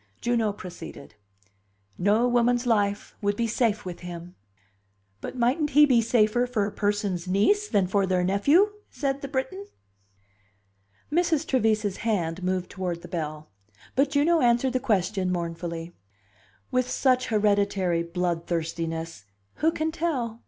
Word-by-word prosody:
Juno 235 -3 +1
proceeded. 180 - -10 0.8
"No 210 +6 +2
woman's 245 0 +2
life 205 -3 0
would 205 0 +1
be 235 - 0
safe 225 -2 0
with 180 -2 -6
him." 175 0 -8 0.9
"But - - -6
mightn't 260 +6 +1
he 295 +1 +7
be 250 -5 +4
safer 230 +1 +2
for 225 -5 0
a 205 - -4
person's 205 -3 -1
niece 220 - +2
than 200 - +2
for 195 +1 +1
their 185 -1 +1
nephew?" 280 - +3 0.2
said 275 -1 -2
the 275 - -4
Briton. 260 -8 -3 1.4
Mrs. 325 -2 +1
Trevise's 215 -5 +1
hand 185 -6 -1
moved 185 0 -2
toward 180 -3 -4
the - - -8
bell. 155 -5 -5 0.4
But 275 +2 +3
Juno 305 +4 +3
answered 245 +1 +3
the 255 - +1
question 195 -6 0
mournfully: 170 -1 -4 0.8
"With 255 0 +1
such 255 -1 +2
hereditary 200 -5 +1
bloodthirstiness, 165 - -3 0.3
who 320 +2 +2
can 315 0 -2
tell?" 265 -9 -2
210 Hz, 135 wpm, -26 LUFS, 180-250 Hz, 1.4 s, he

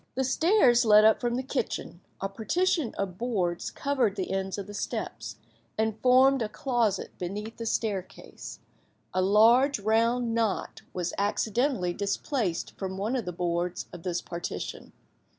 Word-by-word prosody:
The 265 - +1
stairs 265 - +4
led 215 -1 +7
up 220 - +5
from 240 -1 0
the 260 - -2
kitchen; 250 -8 -3 0.2
a 195 - -1
partition 265 - 0
of 190 -2 -4
boards 190 -8 -1
covered 260 -8 0
the 190 -2 -3
ends 190 0 -2
of 200 - -4
the 205 - -10
steps, 160 - -4 0.4
and 220 0 0
formed 260 +1 +5
a 215 - -1
closet 235 -6 -1
beneath 205 +5 -5
the 230 - -4
staircase; 200 -5 -4 0.6
a 185 - +1
large 230 +8 +5
round 230 +3 +1
knot 225 -3 -1
was 180 -1 -3
accidentally 210 -1 0
displaced 200 - -2
from 190 -1 -4
one 215 +6 -1
of 240 -6 -2
the 180 - -3
boards 175 0 -2
of 175 - -8
this 175 0 -2
partition. 170 0 -6
215 Hz, 150 wpm, -28 LUFS, 190-245 Hz, 0.6 s, led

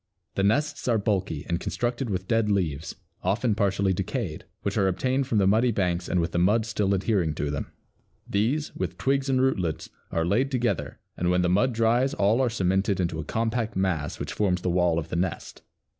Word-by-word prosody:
The - - -1
nests 145 +10 +1
are 120 -2 +3
bulky 100 -7 -1
and 85 -1 0
constructed 120 +1 -2
with 95 -1 -3
dead 115 -2 +2
leaves, 85 -7 -1 0.3
often 105 +5 +1
partly 100 -2 +1
decayed, 95 - -3 0.2
which - - -1
are 95 - +3
obtained 130 +8 0
from 115 - 0
the 100 - +4
muddy 110 +6 +4
banks 90 -4 -1
and 90 - +1
with 85 0 -1
the 85 - 0
mud 105 +5 +3
still 105 -3 0
adhering 95 -5 0
to 75 0 -2
them. 70 - -4 0.6
These, 125 +9 0
with - - -3
twigs 135 +1 0
and 130 -1 +2
rootlets, 95 - 0 0.2
are 80 0 0
laid 115 +10 +2
together 120 - -1 0.2
and 90 - 0
when 90 0 +2
the 90 - +2
mud 120 +8 +2
dries 115 +4 +2
all 105 +5 +3
are 130 - +2
cemented 95 -2 +1
into 85 -3 -1
a - - -3
compact 115 +3 -1
mass 85 -6 -1
which - - -4
forms 90 -4 0
the 90 - +1
wall 90 -2 +2
of 80 0 -3
the - - -3
nest. 85 0 -3
100 Hz, 205 wpm, -26 LUFS, 90-115 Hz, 0.6 s, the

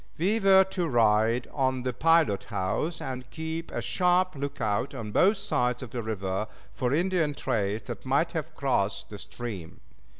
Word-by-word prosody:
We 200 +7 +1
were 195 -2 +7
to 185 -2 -2
ride 115 -1 +3
on 130 -2 0
the 125 -1 -1
pilot 160 -9 +3
house 110 - -2
and 130 -1 -5
keep 160 +2 -5
a - - -4
sharp 185 0 +2
lookout 135 -3 -2
on 110 -4 -5
both 195 - +4
sides 125 - 0
of 125 - -9
the 120 - -3
river 100 -2 -2 0.3
for 125 +3 -1
Indian 165 -1 +1
trails 105 -3 -1
that - - -7
might 140 +5 +1
have 160 -4 -4
crossed 100 -8 -1
the 105 - -7
stream. 100 -10 -7
130 Hz, 165 wpm, -28 LUFS, 110-165 Hz, 0.3 s, were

